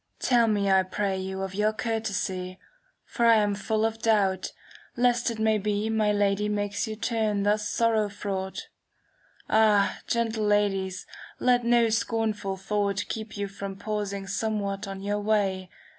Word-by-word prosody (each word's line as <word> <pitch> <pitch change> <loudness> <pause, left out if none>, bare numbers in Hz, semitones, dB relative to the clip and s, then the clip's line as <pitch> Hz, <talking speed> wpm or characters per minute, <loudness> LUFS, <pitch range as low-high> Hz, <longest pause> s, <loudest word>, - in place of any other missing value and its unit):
Tell 240 -3 +3
me, 205 -2 +1
I 190 0 +6
pray 190 +1 -2
you, 190 0 -4
of 190 -1 -5
your 210 +2 +1
courtesy; 200 -5 -3 0.5
For 235 -1 +1
1 230 -1 +7
am 205 -1 +2
full 215 +2 0
of 225 0 -2
doubt, 200 -4 +1 0.5
lest 240 0 +2
it 230 - -4
may 220 -1 +2
be 210 +2 -1
My 215 -1 +2
Lady 205 0 +1
makes 205 +1 -1
you 215 - -4
turn 215 -3 0
thus 210 +1 +1
sorrow 225 -2 +2
fraught. 190 -2 -5 0.8
AL, 215 -2 +4 0.2
gentle 225 -2 0
ladies, 195 -3 0 0.3
let 245 -1 +3
no 235 -1 +4
scornful 220 -3 -1
thought 200 +1 -1
* - - -25
Keep 220 -1 -5
you 200 0 -2
from 195 0 -7
pausing 200 -1 -3
somewhat 200 0 -2
on 195 0 -6
your 205 +1 -1
way. 200 -3 0
210 Hz, 160 wpm, -27 LUFS, 195-220 Hz, 0.8 s, 1